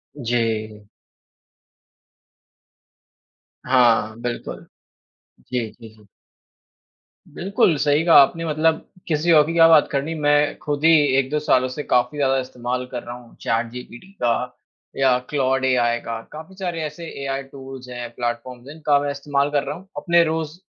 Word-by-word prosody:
जी। 110 Hz, -5 st, -2 dB, 2.8 s
हाँ, 115 Hz, -4 st, +3 dB
बिल्कुल। 120 Hz, -1 st, -5 dB, 0.9 s
जी, 120 Hz, -3 st, -1 dB
जी, 115 Hz, -2 st, -14 dB
जी। 105 Hz, -1 st, -21 dB, 1.3 s
बिल्कुल, 185 Hz, -2 st, +2 dB
सही 145 Hz, +2 st, +2 dB
कहा 170 Hz, -, +5 dB
आपने 165 Hz, +4 st, +1 dB
मतलब 160 Hz, +1 st, +1 dB, 0.2 s
किसी 160 Hz, +1 st, +1 dB
और 150 Hz, -2 st, +6 dB
की 165 Hz, -, -3 dB
क्या 165 Hz, -1 st, +7 dB
बात 160 Hz, -2 st, +6 dB
करनी? 145 Hz, +3 st, -2 dB
मैं 145 Hz, -1 st, +2 dB
खुद 145 Hz, -1 st, -3 dB
ही 165 Hz, -, +7 dB, 0.3 s
1-2 135 Hz, +3 st, 0 dB
सालों 130 Hz, -4 st, +2 dB
से 135 Hz, +4 st, -5 dB
काफ़ी 125 Hz, +3 st, +1 dB
ज़्यादा 135 Hz, -2 st, +2 dB
इस्तेमाल 125 Hz, 0 st, -4 dB
कर 120 Hz, -2 st, -5 dB
रहा 120 Hz, +1 st, -7 dB
हूँ 120 Hz, -1 st, -15 dB
चैटजीपीटी 120 Hz, +7 st, -4 dB
का 120 Hz, -1 st, +2 dB, 0.7 s
या 130 Hz, -2 st, +3 dB
क्लॉड 135 Hz, -2 st, 0 dB
एआई 120 Hz, -2 st, +2 dB
का। 115 Hz, -1 st, -4 dB
काफ़ी 160 Hz, +5 st, -10 dB
सारे 175 Hz, -4 st, -3 dB
ऐसे 155 Hz, +3 st, -6 dB, 0.2 s
एआई 135 Hz, 0 st, -3 dB
टूल्स 135 Hz, -1 st, -11 dB
हैं, 120 Hz, -1 st, -6 dB
प्लेटफ़ॉर्म्स 120 Hz, +1 st, -5 dB
हैं, 145 Hz, -, -9 dB
इनका 150 Hz, -2 st, +2 dB
मैं 145 Hz, 0 st, -2 dB
इस्तेमाल 140 Hz, 0 st, -1 dB
कर 145 Hz, -1 st, +1 dB
रहा -, -, -4 dB
हूँ 190 Hz, +3 st, -14 dB
अपने 170 Hz, -1 st, +3 dB
रोज़ 160 Hz, 0 st, -3 dB
135 Hz, 150 wpm, -21 LUFS, 120-150 Hz, 2.8 s, क्या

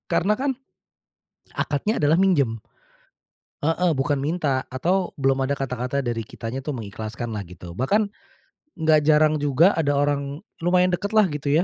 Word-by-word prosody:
Karena 205 Hz, +4 st, +2 dB
kan, 270 Hz, -1 st, 0 dB, 1.0 s
akadnya 180 Hz, +10 st, -1 dB
adalah 150 Hz, +2 st, +4 dB
minjem. 140 Hz, -12 st, +2 dB, 1.0 s
Heeh. 165 Hz, +2 st, +2 dB
Bukan 135 Hz, +1 st, 0 dB
minta 145 Hz, -3 st, -1 dB
atau 175 Hz, +8 st, -1 dB
belum 135 Hz, -1 st, +1 dB
ada 140 Hz, +2 st, 0 dB
kata-kata 130 Hz, +1 st, -2 dB
dari 120 Hz, -1 st, -1 dB
kitanya 115 Hz, +4 st, -6 dB
tuh, 145 Hz, +1 st, -4 dB
mengikhlaskan 110 Hz, +2 st, -6 dB
lah, 105 Hz, -, -3 dB
gitu. 90 Hz, 0 st, -10 dB
Bahkan, 200 Hz, -, +1 dB, 0.7 s
nggak 155 Hz, -1 st, +4 dB
jarang 155 Hz, 0 st, +4 dB
juga, 145 Hz, +6 st, +4 dB
ada 145 Hz, -3 st, +1 dB
orang 140 Hz, 0 st, -1 dB, 0.2 s
lumayan 180 Hz, +1 st, +3 dB
dekat 205 Hz, +4 st, -3 dB
lah, 215 Hz, -2 st, +5 dB
gitu 145 Hz, -2 st, -3 dB
145 Hz, 145 wpm, -23 LUFS, 130-170 Hz, 1.0 s, lah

